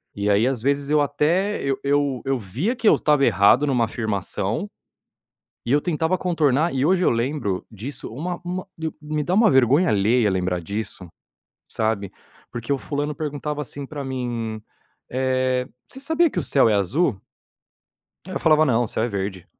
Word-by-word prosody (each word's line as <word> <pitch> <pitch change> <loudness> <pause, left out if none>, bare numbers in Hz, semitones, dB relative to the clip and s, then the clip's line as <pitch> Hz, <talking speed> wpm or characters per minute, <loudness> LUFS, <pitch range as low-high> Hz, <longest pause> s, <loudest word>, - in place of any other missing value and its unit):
E 100 0 -1
aí 105 +4 +3
às 130 -4 -1
vezes 140 +2 0
eu 150 0 +4
até 165 +8 +1
eu 135 -1 -1
eu 140 -2 +1
eu 135 0 +1
via 130 - -2
que 230 - 0
eu - - +7
estava 150 -2 +3
errado 105 +6 +4
em - - -1
uma 125 -3 +2
afirmação, 110 - -3 1.0
e 120 - +1
eu 145 - +4
tentava 165 +2 0
contornar, 160 -2 +1
e 135 +1 +1
hoje 185 +1 +3
eu - - +4
lembro 115 -5 -1
disso 115 +6 -7
uma 175 +7 -4
uma 180 +1 -4
eu 160 -1 -4
me 150 0 -2
dá 175 - -1
uma 215 0 +5
vergonha 135 +7 +4
alheia 110 +3 +3
lembrar 90 -1 -1
disso, 100 +1 -5 0.6
sabe. 110 -3 -1 0.4
Porque 120 +2 -3
o 140 - 0
fulano 145 +2 -3
perguntava 150 0 -4
assim 140 0 -6
para 145 +1 -6
mim, 120 -4 -4 0.5
eh, 130 0 0 0.2
"você 265 - -10
sabia 320 +3 +2
que 185 - -4
o - - +1
céu 135 -2 +3
é - - +3
azul?". 105 - +1 1.1
Aí 190 - -8
eu - - -3
falava: 155 -1 +5
"Não, 120 -4 +2
o - - -5
céu 110 - -2
é 120 - 0
verde". 95 -3 -4
135 Hz, 185 wpm, -23 LUFS, 110-155 Hz, 1.1 s, eu